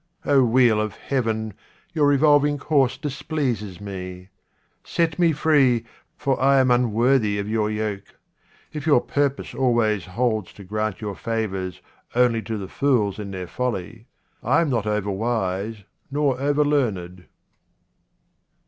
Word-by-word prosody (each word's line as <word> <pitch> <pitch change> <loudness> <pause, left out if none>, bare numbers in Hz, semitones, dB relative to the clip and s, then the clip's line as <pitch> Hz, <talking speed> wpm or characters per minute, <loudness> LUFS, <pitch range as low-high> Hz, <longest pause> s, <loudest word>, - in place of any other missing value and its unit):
O 140 -2 +4
wheel 120 -2 +4
of 110 -1 -3
Heaven, 110 -5 -2 0.4
your 150 -3 +3
revolving 145 0 +4
course 140 -3 +1
displeases 130 - -3
me. 90 -2 -7 0.5
Set 165 -1 -1
me 170 -2 +4
free, 140 -6 +3 0.3
for 135 -3 -1
I 135 +1 +5
am 130 -1 +3
unworthy 120 -2 +2
of 100 0 -3
your 110 -1 0
yoke. 105 -2 -4 0.6
If 150 0 -5
your 145 -5 +6
purpose 140 -1 -1
always 115 -6 +1
holds 110 0 -1
to 100 - -12
grant 110 +3 -3
your 105 -2 -3
favours 95 -7 -3 0.3
only 120 -2 +3
to 110 0 -4
the 95 -2 -6
fools 110 -4 +1
in 100 -1 -5
their 95 -2 -5
folly, 115 +1 -4 0.3
I - - +3
am 160 -4 0
not 115 -4 0
over 105 -1 -1
wise 105 -1 -2 0.3
nor 140 -2 0
over 145 +1 +2
learned. 95 -11 -1
115 Hz, 140 wpm, -23 LUFS, 105-140 Hz, 0.6 s, your